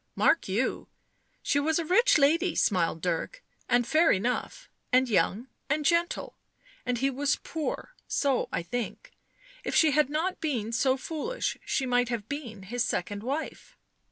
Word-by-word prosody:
" - - -47
Mark 335 - +3
you, 210 +7 -1 0.6
she 285 - +2
was 315 +2 +1
a 335 - -1
rich 375 +7 +5
lady," 330 +5 +3
smiled 170 -5 +1
Dirk, 180 - -2
" - - -37
and 245 0 +3
fair 315 +6 +4
enough, 250 - -1 0.2
and 255 +1 +4
young 210 +3 +1 0.2
and 295 +1 0
gentle, 340 +2 0 0.5
and 250 -1 +1
he 270 +3 +1
was 280 +2 +1
poor; 320 +9 -5
so 275 -3 +1
I - - -2
think, 245 - -5 0.5
if - - -3
she 315 -2 +5
had 300 -1 +3
not 325 +5 -2
been 245 -9 -1
so 260 +2 +2
foolish, 330 - -3
she 270 - 0
might 245 -1 +2
have 230 -4 -3
been 235 -8 -6
his 240 +5 -1
second 205 +1 -2
wife." 280 +7 -5
270 Hz, 165 wpm, -28 LUFS, 235-315 Hz, 0.6 s, rich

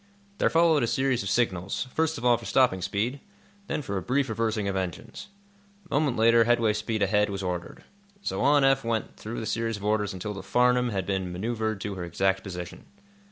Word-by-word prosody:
There - - +3
followed 165 -2 +4
a 120 - +1
series 130 0 +1
of 100 - -3
signals, 100 0 0
first 160 -1 0
of 125 - -6
all 120 -1 +6
for - - -8
stopping 125 -8 +3
speed, 105 +9 -2 0.5
then 150 - -2
for 100 -5 -3
a - - -2
brief 135 +3 0
reversing 110 -2 -1
of 100 - -1
engines. 95 - -5 0.6
A 175 - -9
moment 145 -3 +1
later 115 +1 +5
headway 115 -2 +3
speed 110 0 -1
ahead 105 +1 +2
was 100 -1 -4
ordered. 90 -1 -5 0.4
So 95 - -2
on 145 +1 +4
Eph 135 0 +3
went 115 -1 -2
through 115 +2 -6
the 110 - -4
series 115 -1 -1
of 100 - -8
orders 105 -1 +1
until 100 +2 -5
the 100 - -7
"Farnum" 125 +4 +2
had 95 -4 -2
been 95 -2 -2
manœuvred 110 +2 -2
to 105 - -3
her 90 -2 -5
exact 95 +3 0
position. 90 -3 -8
110 Hz, 205 wpm, -27 LUFS, 95-125 Hz, 0.6 s, all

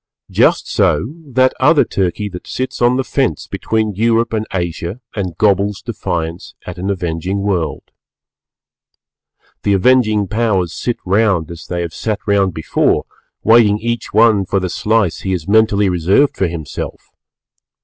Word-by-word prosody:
Just - - +3
so 120 +8 +1
that 130 0 +2
other 150 +4 +4
Turkey 95 +2 -2
that 90 -2 -10
sits 130 -1 -4
on 120 +1 +3
the 135 - 0
fence 130 - -1
between 110 -1 -2
Europe 115 +3 +1
and 110 -1 -2
Asia 85 +2 -3 0.2
and 90 -5 -4
gobbles 100 0 +2
defiance 85 0 -4
at 90 0 -7
an 95 +2 -3
avenging 90 +1 -2
world. 95 -5 -2 1.7
The 100 - +1
avenging 110 -1 +3
Powers 100 -5 0
sit 120 - -2
round 95 -4 +1
as 85 - -10
they 85 -1 -3
have 85 -2 -4
sat 110 -2 -2
round 100 -3 +1
before, 80 - +1 0.4
waiting 110 -2 +5
each 120 +2 -3
one 110 -2 +4
for 95 +1 0
the 90 -1 -3
slice 105 -1 0
he 95 - -2
has 85 -3 -4
mentally 105 -1 +3
reserved 95 - +2
for 95 - 0
himself. 80 -4 -7
100 Hz, 150 wpm, -17 LUFS, 90-115 Hz, 1.7 s, waiting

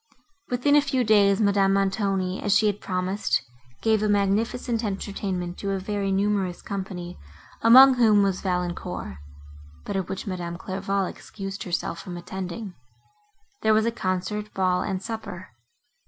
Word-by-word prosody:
Within 250 +4 +2
a 295 - +7
few 270 -3 0
days, 205 -3 +4
Madame 200 -2 +3
Montoni, 195 -1 0
as 205 0 +3
she 220 - +2
had 205 -1 0
promised, 185 +2 0 0.4
gave 220 -2 +3
a 215 - +1
magnificent 220 +4 0
entertainment 195 -3 -3
to 200 - -3
a 195 - -1
very 200 0 -2
numerous 195 -2 0
company, 185 -3 -6 0.4
among 260 +4 +9
whom 220 -5 +4
was 195 -2 0
Valancourt; 180 - -3 0.7
but 200 - -4
at 190 -2 -2
which 190 - -4
Madame 175 -3 -4
Clairval 195 +1 -2
excused 195 +1 -7
herself 170 -2 -2
from 180 -2 -7
attending. 190 +3 -6 0.9
There 220 0 +4
was 215 +1 +3
a 230 - +1
concert, 210 0 -3
ball 185 -1 +2
and 190 -1 -3
supper. 195 -5 -6
195 Hz, 145 wpm, -25 LUFS, 185-215 Hz, 0.9 s, among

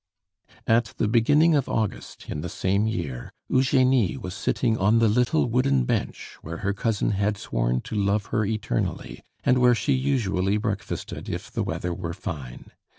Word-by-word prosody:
At 115 0 +2
the - - +1
beginning 145 +9 +4
of 140 -3 +1
August 110 -3 -3
in 75 - -4
the 90 - -4
same 100 +3 0
year, 70 - -4 0.2
Eugenie 130 -4 +3
was 90 - -6
sitting 115 +3 0
on 105 +4 +4
the 115 0 +4
little 125 +8 +2
wooden 115 - +2
bench - - -3
where 80 +1 -6
her 100 - +1
cousin 105 +1 0
had 100 +1 0
sworn - - -1
to - - -7
love 100 0 +1
her 110 - +2
eternally, 105 - -3 0.2
and 125 0 +3
where 125 -1 +5
she 140 +4 0
usually 105 -8 +1
breakfasted 105 -2 -4
if - - -5
the - - -2
weather 90 0 -2
were 85 -1 -5
fine. 75 - -7
105 Hz, 165 wpm, -25 LUFS, 95-120 Hz, 0.2 s, where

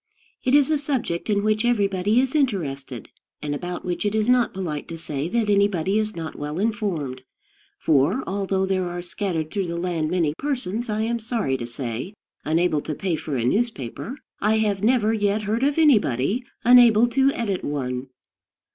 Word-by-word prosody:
It 260 - +3
is 290 +1 +4
a 305 - +2
subject 255 - -2
in 205 -1 +2
which 215 +1 +1
everybody 205 -2 +2
is 265 0 0
interested, 145 - -2 0.3
and 145 -1 -3
about 175 +4 -5
which 180 -1 -2
it 205 0 0
is 215 0 +1
not 250 -2 +3
polite 165 -6 -4
to 165 - -6
say 150 -1 -4
that 230 +2 0
anybody 200 -1 +2
is 215 0 -2
not 160 -2 -5
well 150 +2 -5
informed; 190 - -2 0.6
for, 155 - +2
although 195 -1 -1
there 185 -2 0
are 175 0 -5
scattered 175 -4 -3
through 195 -3 -1
the 170 0 -3
land 170 -3 -1
many 165 -4 +1
persons, 245 -5 -2
I 215 0 -1
am 235 +1 -1
sorry 220 - -1
to 120 -2 -4
say, 120 - -5 0.3
unable 160 -1 +1
to 155 - -4
pay 180 0 -1
for 155 -2 -4
a 115 - -1
newspaper, 225 - -2 0.2
I 215 +2 +2
have 205 -3 0
never 225 -1 +3
yet 205 0 0
heard 215 +3 -1
of 280 +2 +1
anybody 225 - +3 0.2
unable 240 -2 +7
to 270 +2 +3
edit 200 -6 -2
one. 130 -3 -3
195 Hz, 180 wpm, -23 LUFS, 160-225 Hz, 0.6 s, unable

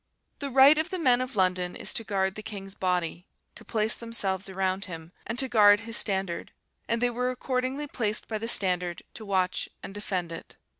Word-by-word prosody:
The 280 -2 -3
right 275 +4 +7
of 315 - -1
the 375 - -3
men 255 -7 +3
of 255 -1 -4
London 185 -2 +1
is - - 0
to 225 - -1
guard 190 -2 0
the 215 - -7
king's 200 -3 -7
body, 180 -1 -1 0.3
to - - -11
place 220 0 0
themselves 200 -5 -2
around 190 0 -1
him, 165 -2 -9 0.2
and 230 - -3
to 265 - +2
guard 205 -3 +6
his 230 0 -4
standard; 190 -5 0 0.4
and 230 +1 0
they 245 - +3
were 250 +1 -1
accordingly 255 +2 -2
placed 220 -7 -2
by 215 -1 -3
the 225 - -4
standard 180 -5 +2
to 220 - -9
watch 185 -2 0
and - - -7
defend 185 -4 -3
it. 165 - -9
210 Hz, 200 wpm, -27 LUFS, 185-245 Hz, 0.4 s, right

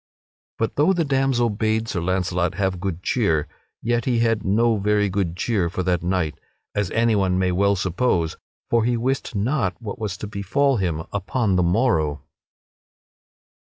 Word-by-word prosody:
But 115 - -2
though 155 +7 +4
the 170 -3 0
damsel 135 -4 +1
bade 110 +2 0
Sir 90 - -2
Launcelot 90 -1 0
have 95 -2 -1
good 90 -2 -4
cheer, 85 -11 +1 0.4
yet 120 0 0
he 125 -2 +1
had 115 -2 +1
no 110 +3 +2
very 105 0 +1
good 95 -3 -2
cheer 100 -7 0
for 95 +1 -3
that 90 -1 +1
night, 90 -3 -1 0.3
as 100 -3 -1
anyone 105 -5 +2
may 95 -1 +1
well 100 +2 +2
suppose, 90 -2 0 0.4
for 115 -1 +3
he 120 +1 +1
wist 130 0 -2
not 105 - 0
what 115 0 -6
was 105 -3 -3
to - - -6
befall 110 +7 +1
him 85 -5 -1
upon 100 +1 0
the 90 - +3
morrow. 85 - +1
100 Hz, 165 wpm, -23 LUFS, 90-115 Hz, 0.4 s, though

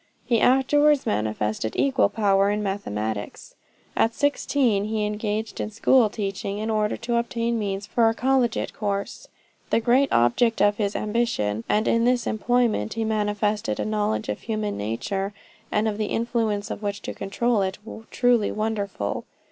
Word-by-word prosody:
He 235 -2 +2
afterwards 290 +3 +4
manifested 105 +1 -1
equal 275 -1 +2
power 200 -2 +2
in 210 0 -1
mathematics. 110 - -4 0.4
At 225 +1 +2
sixteen, 270 -7 +1
he 215 0 -1
engaged 210 +1 -3
in - - -3
school 225 +2 +3
teaching, 200 -1 -4
in 220 +1 -2
order 215 -1 0
to 235 0 -1
obtain 235 0 -1
means 200 -1 -3
for 225 +2 +3
a 225 - -2
collegiate 250 -1 +1
course 200 -1 -3 0.4
the - - +3
great 250 +4 +3
object 120 - +3
of 205 +1 +3
his 205 -2 -1
ambition 210 - -1
and 215 +1 +2
in 230 0 +3
this 245 0 +2
employment 225 - 0
he 225 - -1
manifested 210 0 -1
a - - -1
knowledge 205 - -1
of 105 - -3
human 215 -2 -2
nature 155 - -3 0.4
and 210 +1 +1
of 215 -1 -2
the 215 - 0
influences 225 -3 -1
which 200 -1 -3
control 230 +2 -1
it, 190 0 -2 0.3
truly 245 -4 +2
wonderful. 205 - -3
215 Hz, 150 wpm, -24 LUFS, 200-235 Hz, 0.4 s, afterwards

